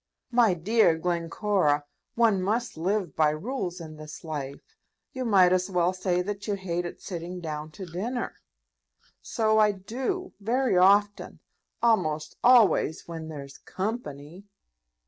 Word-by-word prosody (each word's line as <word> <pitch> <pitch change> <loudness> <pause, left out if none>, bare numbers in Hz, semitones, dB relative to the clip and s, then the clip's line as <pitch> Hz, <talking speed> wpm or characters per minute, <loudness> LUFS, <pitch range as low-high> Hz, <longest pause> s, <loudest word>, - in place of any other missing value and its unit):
"My 235 -6 +4
dear 180 -1 +3
Glencora, 170 -2 0 0.3
one 225 -5 +3
must 225 +6 -1
live 180 -1 -1
by 155 -1 +4
rules 180 - -4
in 155 -2 -9
this 155 0 -10
life. 150 - -7 0.4
You 260 -1 -3
might 190 -5 +5
as 185 +1 +1
well 180 -1 +1
say 180 -1 0
that 205 +1 -5
you 205 - 0
hated 175 -2 -4
sitting 180 -1 -6
down 155 -2 -5
to 190 - -7
dinner." 215 +9 -4 0.8
"So 220 -1 +1
I 210 -1 +5
do, 260 - -4
very 240 +3 +1
often; 200 +3 +3 0.4
almost 155 -10 +1
always 235 -10 +4
when 165 -2 -6
there's 140 -3 -9
company." 185 - -5
185 Hz, 130 wpm, -27 LUFS, 160-215 Hz, 0.8 s, might